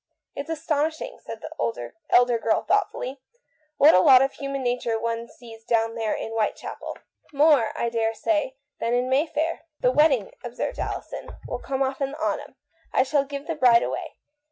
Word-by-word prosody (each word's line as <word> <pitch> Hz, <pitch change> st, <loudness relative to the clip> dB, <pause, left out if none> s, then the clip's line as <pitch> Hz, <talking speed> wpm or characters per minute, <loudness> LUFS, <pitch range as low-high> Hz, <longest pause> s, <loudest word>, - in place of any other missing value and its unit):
" -, -, -57 dB
"It's 280 Hz, +3 st, -6 dB
astonishing," 320 Hz, +7 st, -2 dB
said -, -, -8 dB
the -, -, -8 dB
elder 460 Hz, -, -3 dB, 0.2 s
woman 240 Hz, -2 st, +3 dB
thoughtfully, 305 Hz, -9 st, 0 dB, 0.6 s
"what 295 Hz, -, +7 dB
a 180 Hz, -, +7 dB
lot 255 Hz, +7 st, +7 dB
of 270 Hz, -, -1 dB
human 275 Hz, -1 st, -4 dB
nature 245 Hz, -2 st, 0 dB
one 230 Hz, +1 st, -3 dB
sees 230 Hz, -2 st, -14 dB
down 225 Hz, 0 st, +1 dB
there 225 Hz, -2 st, -1 dB
in 225 Hz, -, -5 dB
Whitechapel." 225 Hz, -2 st, -3 dB, 0.2 s
" -, -, -32 dB
More, 285 Hz, -6 st, +4 dB
I 235 Hz, -, 0 dB
daresay, 235 Hz, +6 st, 0 dB, 0.2 s
than 235 Hz, +1 st, 0 dB
in 250 Hz, +1 st, 0 dB
Mayfair." 315 Hz, +4 st, 0 dB, 0.2 s
"The 250 Hz, -, +4 dB
wedding," 270 Hz, -7 st, +3 dB
observed 245 Hz, -, -4 dB
Alison, -, -, -5 dB, 0.2 s
"will -, -, -4 dB
come 270 Hz, 0 st, -1 dB
off 265 Hz, +1 st, -3 dB
in 275 Hz, 0 st, -1 dB
the -, -, -7 dB
autumn -, -, -2 dB, 0.2 s
— -, -, -37 dB
I -, -, +4 dB
shall 280 Hz, +1 st, +1 dB
give 280 Hz, 0 st, -6 dB
the 330 Hz, -, -2 dB
bride 245 Hz, -6 st, +5 dB
away. -, -, -4 dB
265 Hz, 180 wpm, -25 LUFS, 230-300 Hz, 0.6 s, what